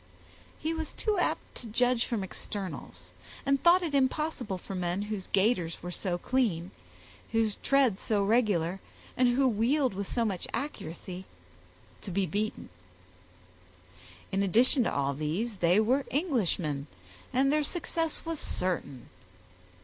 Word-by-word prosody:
He 320 +1 -2
was 320 -1 -4
too 425 -4 0
apt - - -1
to 240 - -7
judge 245 +2 +2
from 225 -5 -2
externals, 160 - -6 0.3
and 275 0 +2
thought 355 +2 +6
it 320 -4 -2
impossible 265 -6 0
for 190 - -8
men 180 +1 -1
whose 210 -3 -4
gaiters 190 -6 +1
were 175 - -4
so 180 -1 -2
clean, 190 -6 0 0.6
whose 225 -2 +2
tread 265 -8 +3
so 205 -2 +1
regular, 195 -5 +2 0.4
and 250 - +4
who 270 0 +4
wheeled 250 +3 +2
with 200 0 -4
so 235 -2 +1
much 195 -5 -2
accuracy, 185 - -5 0.8
to - - -6
be 190 +2 +1
beaten. 210 +5 -3 1.6
In 195 - +1
addition 235 - +4
to - - +1
all 140 0 0
these, 170 - -2
they 175 +3 +4
were 255 +6 +2
Englishmen, 185 - 0 0.4
and 275 +3 +3
their 305 0 +3
success 330 0 -2
was 330 -2 -3
certain. 145 -8 -2
215 Hz, 140 wpm, -30 LUFS, 180-265 Hz, 1.6 s, thought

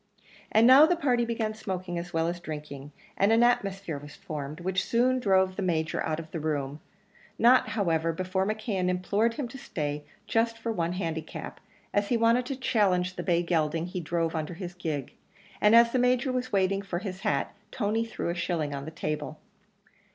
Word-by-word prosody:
And 220 +2 +5
now 270 +5 +9
the 355 - +2
party 250 -7 +1
began 225 -2 -2
smoking 185 -5 -4
as 175 +1 -7
well 165 0 +1
as 175 +1 -3
drinking; 150 -3 -7 0.3
and 200 +2 +3
an 225 +1 +5
atmosphere 195 -9 0
was 145 0 -11
formed, 150 0 -6
which 185 +1 -1
soon 255 +2 +2
drove 190 -4 +2
the 200 - -3
Major 160 -4 0
out 155 0 -2
of 160 -1 -9
the 165 - -3
room 145 -2 -2 0.6
not, 250 +2 +5
however, 165 -4 +1
before 185 +3 -1
McKeon 215 -4 -1
implored 200 +6 +1
him 270 -1 -3
to 270 - -9
stay 150 -7 -4 0.2
just 230 +1 +1
for 230 0 -3
one 175 -4 -1
handicap, 165 -4 -5 0.3
as 205 0 +1
he 240 - +2
wanted 230 +2 +3
to 275 - -3
challenge 190 -8 +1
the - - -4
bay 175 -2 +1
gelding 165 -1 0
he 180 +1 -4
drove 165 0 -1
under 160 +1 -3
his 180 -1 -6
gig; 155 -6 -4 0.5
and 210 +2 +6
as 235 0 +7
the 255 - +1
Major 250 +1 +2
was 255 0 -2
waiting 195 0 +2
for 190 -3 -4
his 190 0 -5
hat, 140 -7 -1 0.2
Tony 220 0 0
threw 230 -6 -4
a - - 0
shilling 170 -4 -2
on 140 0 -5
the - - -5
table. 155 -1 -4
185 Hz, 195 wpm, -28 LUFS, 165-225 Hz, 0.6 s, now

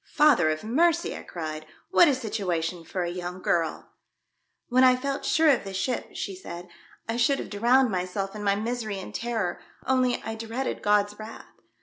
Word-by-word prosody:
"Father 290 - +5
of 155 0 -2
Mercy!" 315 +9 +2
I - - -7
cried, 155 -2 -6 0.2
"what 350 -2 +7
a 285 - +3
situation 180 -8 -2
for 180 +2 -3
a 175 - -2
young 180 +1 -5
girl 165 -3 -1 0.4
!" - - -51
"When 255 +1 +4
I 255 -1 +7
felt 275 +2 -3
sure 320 0 +4
of 265 - +1
the 195 -1 -7
ship," 235 +6 -2
she 195 - -4
said, 175 -1 -9 0.2
" - - -28
I 225 +1 -2
should 245 +3 +3
have - - -6
drowned 240 +4 +3
myself 190 +2 -3
in 210 - -6
my 200 -1 +3
misery 220 -1 -3
and 190 - -8
terror, 225 -6 -2 0.3
only 255 -1 +2
I 225 - -4
dreaded 230 +4 -4
God's 205 0 +2
wrath. 220 +1 -9
215 Hz, 195 wpm, -26 LUFS, 180-250 Hz, 0.4 s, what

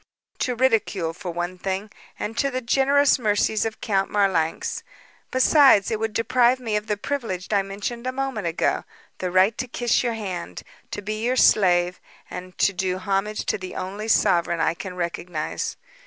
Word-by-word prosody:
"To 250 - 0
ridicule, 220 -9 +1
for 180 - -7
one 175 +2 -4
thing, 195 +3 -3 0.3
and 225 - -4
to 275 - +2
the 255 -1 -2
generous 270 +3 +3
mercies 215 -1 +1
of 220 -1 -5
Count 195 -2 0
Marlanx. 190 -6 0 0.5
Besides, 260 -5 +5
it 220 - -1
would 220 -1 -2
deprive 250 +2 +3
me 225 -4 -2
of 210 +1 -2
the 210 -1 -1
privilege 215 -7 -3
I 200 - +4
mentioned 205 +5 -5
a - - 0
moment 260 -7 -3
ago 165 - 0 0.4
the 185 - -2
right 185 +5 +4
to 255 - -2
kiss 240 -1 +1
your 235 -2 -1
hand, 190 -6 -5 0.3
to 205 - -6
be 215 +2 -3
your 250 +2 +1
slave 180 -6 +4 0.3
and 185 0 -8
to 195 - +3
do 185 0 -1
homage 195 +3 -1
to - - -1
the 185 -1 -7
only 200 +4 -5
sovereign 175 -6 +2
I 160 0 +2
can 180 +1 -7
recognize. 170 -2 -3
205 Hz, 175 wpm, -24 LUFS, 185-235 Hz, 0.5 s, Besides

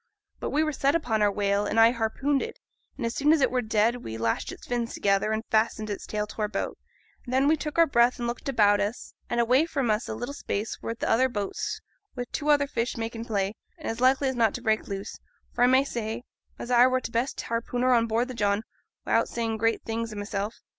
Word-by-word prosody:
But - - -3
we 305 +2 +2
were 310 - 0
set 280 0 +1
upon 245 -10 0
our 205 -1 +4
whale, 200 0 0
and 225 - +1
I 225 +1 +7
harpooned 260 +4 0
it; 455 - -5 0.4
and 255 - -3
as 230 - -1
soon 290 +2 +3
as 320 - +5
it 270 - +3
were 250 0 +1
dead 220 +1 +2
we 115 - -7
lashed 115 0 -1
its - - -11
fins 240 -1 -2
together, 200 +1 +1
and 220 0 -1
fastened 215 -1 +1
its 200 - -5
tail 210 0 -2
to 210 - -8
our 210 - +1
boat; - - -4 0.4
and 245 - -8
then 265 +2 +3
we 315 - +5
took 300 -1 -5 0.2
breath 240 +1 +4
and 240 - -3
looked 240 +3 -4
about 205 -5 +4
us, 205 +4 -3 0.2
and 240 - 0
away 255 +7 +4
from 270 -8 0
us 215 +3 -1
a - - -3
little 245 +4 -5
space 215 -5 -4
were 230 - -3
th' - - -10
other 255 +3 +3
boats, 205 -4 -3 0.4
wi' 245 - -1
two 300 0 -2
other 290 -1 +5
fish 245 -3 -2
making 230 0 -4
play, 200 -3 -1 0.2
and - - -8
as 225 +2 -3
likely 265 +2 +4
as 260 - -1
not 225 -3 +2
to 245 - -5
break 220 -2 +1
loose, 195 -1 -6 0.3
for 245 - +2
I - - +5
may 260 +2 +5
say 230 -3 -4 0.3
as 240 - -6
I 245 +1 +7
were 255 0 +2
th' 255 - -6
best 235 +4 -1
harpooner 245 +2 0
on 230 -1 +3
board 230 +2 +1
the - - -5
John, 205 -2 0 0.4
wi'out - - +2
saying 225 -2 -2
great 225 +1 +1
things 225 0 -3
o' - - -7
mysel'. 205 0 -3
230 Hz, 240 wpm, -27 LUFS, 215-255 Hz, 0.4 s, I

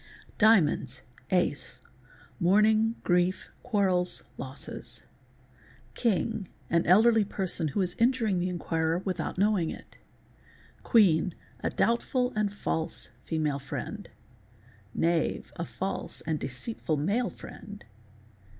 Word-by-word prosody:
_ - - -30
Diamonps.—Ace—mourning, 190 - +1
grief, 180 +1 +1
quarrels, 190 -6 +1
losses. - - -8 0.9
King—an 200 -5 -1
elderly 220 +4 +6
person 190 -4 -2
who 175 +7 -1
is 180 -1 0
injuring 230 -5 +2
the 180 +1 0
inquirer 165 -2 -1
without 180 -4 -3
knowing 195 -4 +2
it. - - -10 0.9
Qwueen—a 180 -6 +2
— - - -13
doubtful 250 +2 0
and 210 -1 +1
false 160 -5 -1 0.2
female 150 -3 -1
friend. 205 +9 -6 0.9
Anave—a 170 0 0
false 190 +3 -4
and 155 -1 -2
deceitful 155 - -3
male 205 - 0
friend. 205 0 -11
185 Hz, 95 wpm, -28 LUFS, 165-215 Hz, 0.9 s, elderly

